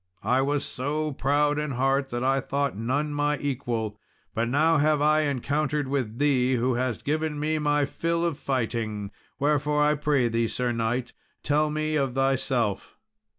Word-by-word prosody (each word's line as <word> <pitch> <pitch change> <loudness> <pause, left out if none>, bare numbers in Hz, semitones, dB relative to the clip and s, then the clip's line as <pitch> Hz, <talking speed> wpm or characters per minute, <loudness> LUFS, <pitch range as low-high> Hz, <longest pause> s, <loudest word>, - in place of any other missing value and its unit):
I 130 +2 +2
was 145 +1 0
so 150 +4 -2
proud 145 +2 +1
in 150 0 -2
heart 135 +2 +1
that 120 +1 -3
I 135 +1 +2
thought 140 0 -1
none 135 +8 -1
my 145 0 +1
equal, 120 -7 -3 0.3
but 115 +1 0
now 155 +5 +3
have 150 0 +3
I 155 +1 +4
encountered 145 +2 -1
with 130 -5 -2
thee, 130 -3 +2
who 125 +2 +1
hast 120 -2 -2
given 155 0 -1
me 155 +1 0
my 145 -1 +2
fill 170 +4 -1
of 165 -4 -2
fighting; 115 -5 -2 0.3
wherefore, 150 +1 +2
I 150 0 +4
pray 145 -4 +1
thee, 115 0 0
Sir 125 +1 -1
knight, 120 +2 -2 0.3
tell 150 +1 +2
me 155 0 -1
of 135 -3 -1
thyself." 130 -5 0
140 Hz, 165 wpm, -26 LUFS, 125-150 Hz, 0.3 s, I